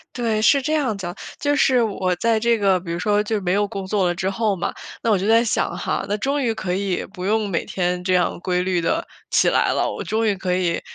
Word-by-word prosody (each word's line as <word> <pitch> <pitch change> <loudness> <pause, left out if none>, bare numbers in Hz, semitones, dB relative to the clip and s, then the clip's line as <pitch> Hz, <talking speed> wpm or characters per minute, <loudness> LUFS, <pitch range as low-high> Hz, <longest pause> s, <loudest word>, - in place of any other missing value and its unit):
对， 225 -3 0
是 280 +5 +4
这 305 +4 -1
样 265 -9 +1
的。 175 -2 -5 0.2
就 290 0 +1
是 255 -4 +4
我 190 -4 -1
在 230 +2 +2
这 235 0 +2
个 195 -2 +3
比 170 -2 -6
如 170 - -3
说 210 +1 +2
就 220 - -4
是 205 - -1
没 180 0 0
有 205 +1 +2
工 195 -3 -6
作 195 -2 +1
了 175 - +1
之 190 +1 -1
后 210 0 0
嘛， - - -2 0.3
那 230 - 0
我 205 - +4
就 190 - -2
在 225 +1 +5
想 215 -6 -1
哈， 185 - -2
“那 205 - 0
终 275 +5 -1
于 230 -2 +1
可 180 -4 -3
以 195 -2 -2
不 180 -2 -7
用 215 +1 +1
每 170 - -1
天 180 -1 -2
这 185 0 +1
样 180 - +1
规 180 -1 0
律 180 -1 0
地 165 - 0 0.2
起 - - +3
来 - - +2
了“，” - - 0
我 - - -5
终 220 +1 0
于 205 - +2
可 185 -1 -2
以， 180 -2 0
200 Hz, 285 characters per minute, -22 LUFS, 180-225 Hz, 0.3 s, 在